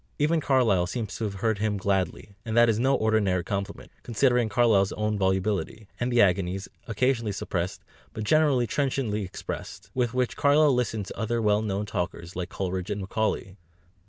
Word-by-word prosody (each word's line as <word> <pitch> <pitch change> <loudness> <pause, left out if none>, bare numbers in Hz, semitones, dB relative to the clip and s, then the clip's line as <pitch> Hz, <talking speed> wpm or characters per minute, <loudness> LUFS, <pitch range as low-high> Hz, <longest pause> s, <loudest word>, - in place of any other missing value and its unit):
Even 155 +2 +2
Carlyle 115 -11 +3
seems 110 +2 -4
to 115 - -3
have 100 -2 -4
heard 110 -3 +1
him 105 -1 0
gladly, 95 0 -1
and 110 0 -3
that 120 0 +7
is 110 -1 +1
no 135 +3 +3
ordinary 105 -6 +1
compliment, 100 +1 -5
considering 120 -1 +2
Carlyle's 105 -3 +3
own 105 0 -1
volubility, 100 +2 -1
and 120 +1 -1
the 120 -2 +5
agonies, 95 0 0 0.2
occasionally 115 -1 0
suppressed 95 -2 -3 0.3
but 110 - -5
generally 140 0 +3
trenchantly 130 -5 -1
expressed, 95 - -7
with 125 -1 -1
which 125 -1 0
Carlyle 145 0 +4
listened 115 -4 -1
to - - -9
other 115 +1 0
well 105 -1 +2
known 105 -1 -2
talkers 90 -2 -4
like 90 0 -4
Coleridge 95 -1 -3
and 105 -1 -2
Macaulay. 100 -1 -2
105 Hz, 170 wpm, -26 LUFS, 95-120 Hz, 0.3 s, that